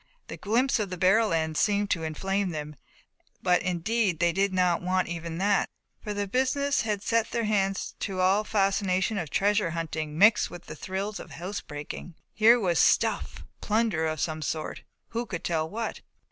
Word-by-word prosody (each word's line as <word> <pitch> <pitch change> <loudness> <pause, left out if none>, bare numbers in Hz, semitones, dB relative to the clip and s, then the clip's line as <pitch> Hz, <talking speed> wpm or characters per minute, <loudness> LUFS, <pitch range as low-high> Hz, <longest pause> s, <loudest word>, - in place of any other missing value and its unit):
The - - -6
glimpse 240 +4 +1
of 205 -3 -2
the 180 - -5
barrel 195 +5 +4
end 160 -1 0
seemed 205 -1 +1
to 170 - +1
inflame 195 +5 -1
them, 150 -2 -5 0.7
but 180 -1 +3
indeed 185 +2 0
they 170 +1 +2
did 195 +3 +1
not 180 -2 +2
want 185 +1 0
even 170 -1 -5
that, 200 +2 +2 0.3
for 210 - -4
the 205 0 -2
business 270 +5 +1
they 220 - -4
had 205 -1 -1
set 230 -1 +1
their 235 - -1
hands 195 -2 0
to 195 - -3
had 185 - +1
all 195 +3 +3
the - - -15
fascination 195 0 +1
of 160 -5 -4
treasure 205 0 +2
hunting 160 -2 -4
mixed 210 +4 +5
with 175 - -10
the 155 - -8
thrills 195 +5 -4
of - - -9
house 185 +4 -5
breaking. 150 +3 -8 0.2
Here 230 +3 +6
was 175 -6 +1
"stuff," - - +2 0.2
plunder 215 -7 +1
of 155 -1 -3
some 155 0 -2
sort, 155 +1 -3 0.3
who 235 +1 -3
could 180 -4 -5
tell 160 -2 -1
what? 225 +4 -4
195 Hz, 190 wpm, -27 LUFS, 170-210 Hz, 0.7 s, Here